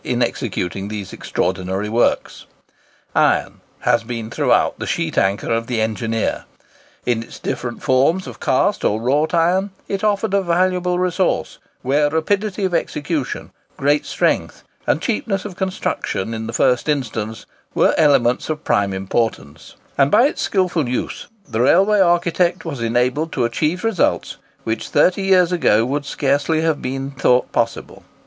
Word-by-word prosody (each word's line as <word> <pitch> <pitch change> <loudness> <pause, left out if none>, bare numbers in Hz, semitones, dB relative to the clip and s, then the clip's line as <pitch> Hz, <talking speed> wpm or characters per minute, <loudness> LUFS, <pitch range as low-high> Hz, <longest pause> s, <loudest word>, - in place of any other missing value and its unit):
In - - 0
executing 95 +3 -3
these 105 -3 -6
extraordinary 95 +2 -2
works, 115 +3 0 0.7
iron - - +1 0.2
has 115 - +2
been 115 -1 -5
throughout - - +2
the - - -4
sheet - - -2
anchor 100 +3 +1
of 115 0 -1
the 120 -3 -1
engineer. 110 +1 -1 0.6
In 120 -2 +1
its 115 - -10
different 120 -1 -4
forms 140 +9 +2
of - - -9
cast - - +1
or 105 - +1
wrought 145 +8 +1
iron, 180 +4 +2 0.2
it 195 +1 -3
offered 210 0 +1
a 200 - +3
valuable 180 0 +1
resource, 180 0 0 0.2
where 145 +3 +2
rapidity 195 +6 0
of 185 - -2
execution, 150 -3 -2 0.3
great 145 +2 +1
strength, - - -1 0.2
and - - +1
cheapness 210 -4 -1
of 195 -4 -6
construction 185 - -2
in 110 0 -4
the - - -4
first 125 +5 +2
instance, 110 -6 -2 0.3
were - - +4
elements 135 -6 +3
of 155 0 -3
prime 100 -1 +1
importance; 95 - -3 0.2
and 140 0 +5
by 220 +8 +5
its 290 - -1
skilful 180 -8 0
use, 125 - -3 0.2
the 110 - -1
railway 195 +10 +4
architect 175 -1 +2
was 140 -7 -5
enabled 125 +7 0
to 120 - +1
achieve 155 +9 -1
results 225 -6 0 0.3
which 110 0 -3
thirty 180 +6 +3
years 185 -2 +4
ago 115 -11 +3
would 140 +3 -2
scarcely 145 +4 0
have 160 -2 0
been 135 +1 -4
thought 125 -2 +2
possible. - - -2
145 Hz, 150 wpm, -20 LUFS, 115-180 Hz, 0.7 s, and